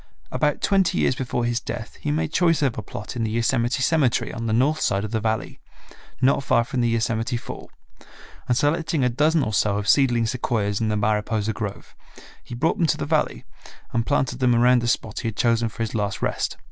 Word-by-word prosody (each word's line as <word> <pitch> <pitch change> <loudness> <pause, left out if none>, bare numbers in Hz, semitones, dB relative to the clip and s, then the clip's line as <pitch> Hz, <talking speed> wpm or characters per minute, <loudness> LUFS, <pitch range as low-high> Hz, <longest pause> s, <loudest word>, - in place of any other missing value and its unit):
About 150 -1 0
twenty 190 -2 +2
years - - +2
before 125 -1 -2
his 120 0 0
death - - -7
he - - -2
made 80 +2 -1
choice 165 -4 +3
of 135 -5 +1
a - - -4
plot 105 +2 -8
in 120 - -2
the 110 - -1
Yosemite 115 +3 0
cemetery 140 -5 +1
on 115 0 -4
the - - 0
north 135 +7 +2
side 100 0 +1
of 105 - -5
the 110 - 0
Valley, 110 0 -2 0.6
not 135 +1 +3
far 120 -3 +3
from 125 +1 -2
the 120 - +2
Yosemite 115 +1 0
Fall, - - -9 0.8
and 125 - +2
selecting 160 +1 +1
a 125 - +3
dozen 150 +5 +2
or 110 - -3
so 100 0 +2
of 105 0 -3
seedling 120 -5 +4
sequoias 110 -4 -1
in 110 - +1
the 105 - 0
Mariposa 105 +1 0
grove 105 -2 -6 0.5
he - - -8
brought 135 +7 0
them 170 - +3
to 150 - +1
the - - -3
Valley 150 +1 0 0.5
and 115 -1 +1
planted 130 -3 0
them 125 -2 +3
around 125 +1 +4
the 120 - -2
spot 110 -2 -1
he - - -3
had 110 - -4
chosen 115 -2 +2
for 115 - -4
his 110 - -4
last 105 -3 -2
rest. - - -2
120 Hz, 220 wpm, -23 LUFS, 110-135 Hz, 0.8 s, seedling